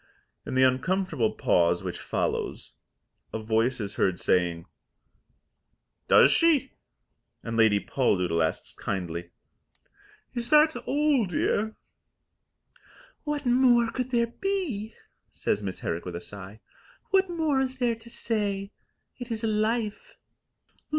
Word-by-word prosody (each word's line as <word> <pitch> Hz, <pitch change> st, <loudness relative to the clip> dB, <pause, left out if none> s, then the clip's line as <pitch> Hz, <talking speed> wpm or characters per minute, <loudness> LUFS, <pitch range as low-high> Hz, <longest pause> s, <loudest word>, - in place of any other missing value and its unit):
In -, -, -3 dB
the 130 Hz, -, +4 dB
uncomfortable 135 Hz, -, +1 dB
pause 85 Hz, 0 st, +2 dB
which -, -, -4 dB
follows, -, -, -3 dB, 0.6 s
a -, -, -3 dB
voice 115 Hz, +3 st, 0 dB
is 105 Hz, -2 st, -5 dB
heard 95 Hz, -2 st, +1 dB
saying, 85 Hz, -2 st, +1 dB, 1.4 s
"Does -, -, +7 dB
she?" 310 Hz, -5 st, +3 dB, 0.7 s
and 115 Hz, -1 st, -4 dB
Lady 110 Hz, -3 st, +4 dB
Poldoodle 90 Hz, -10 st, 0 dB
asks 80 Hz, -, -3 dB
kindly, 85 Hz, -2 st, -4 dB, 1.0 s
"Is 240 Hz, -1 st, -3 dB
that 305 Hz, +1 st, +5 dB
all, 285 Hz, -6 st, +1 dB
dear?" 210 Hz, +5 st, 0 dB, 1.5 s
"What 295 Hz, -1 st, -2 dB
more 245 Hz, -2 st, +4 dB
could 255 Hz, -1 st, -3 dB
there 235 Hz, -2 st, 0 dB
be?" 340 Hz, -, -2 dB, 0.3 s
says 105 Hz, -, -1 dB
Miss 95 Hz, -2 st, -5 dB
Herrick 85 Hz, -, -3 dB
with 90 Hz, -2 st, -5 dB
a -, -, -3 dB
sigh. 100 Hz, +3 st, -10 dB, 0.5 s
"What 385 Hz, -1 st, +3 dB
more 320 Hz, -5 st, 0 dB
is 260 Hz, 0 st, -3 dB
there 245 Hz, -2 st, +1 dB
to 225 Hz, +1 st, -14 dB
say? 205 Hz, -4 st, -2 dB, 0.5 s
It 245 Hz, 0 st, -7 dB
is 225 Hz, -1 st, -4 dB
Life." 215 Hz, 0 st, -1 dB
210 Hz, 120 wpm, -27 LUFS, -, 1.5 s, Does